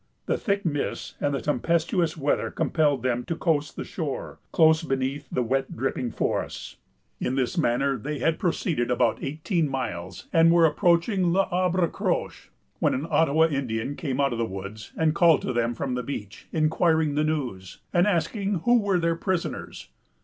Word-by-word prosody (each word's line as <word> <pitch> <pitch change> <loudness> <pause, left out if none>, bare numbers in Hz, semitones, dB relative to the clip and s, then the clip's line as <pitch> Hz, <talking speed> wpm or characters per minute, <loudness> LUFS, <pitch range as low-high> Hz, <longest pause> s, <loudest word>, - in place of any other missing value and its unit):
The - - +1
thick 200 -2 -1
mists 145 -4 -2
and 145 - +1
the 140 - -2
tempestuous 165 - 0
weather 145 -1 0
compelled 145 -6 +1
them 125 -1 0
to 165 - -2
coast 155 -3 0
the - - -4
shore, 155 -6 -5
close 160 -1 +5
beneath 135 -1 -2
the 125 - 0
wet 135 +3 -1
dripping 125 0 -1
forests. - - -3 0.4
In 130 - -1
this 130 +4 0
manner 135 -3 +1
they 150 +7 -4
had 160 +5 0
proceeded 160 -7 0
about 125 - +1
eighteen 155 +2 -1
miles, 90 -9 -4
and 165 0 +6
were 170 -1 +6
approaching 170 +3 +2
L'Arbre 180 -1 +2
Croche, - - -3 0.3
when - - +2
an 140 - -2
Ottawa 160 0 +4
Indian 135 -4 -2
came 140 -4 -3
out 140 -1 +2
of 115 - -4
the - - +2
woods, 100 +1 -7
and 160 -1 +2
called 170 -3 +4
to 130 - -2
them 120 0 0
from 130 +2 -3
the 125 - -1
beach, 115 -5 -7
inquiring 160 -1 +2
the 150 +1 +1
news, 125 - -3 0.2
and 175 +2 +4
asking 195 +1 0
who 240 +3 +4
were 200 -3 +1
their 170 -1 +1
prisoners. 180 0 -3
150 Hz, 170 wpm, -26 LUFS, 130-170 Hz, 0.4 s, and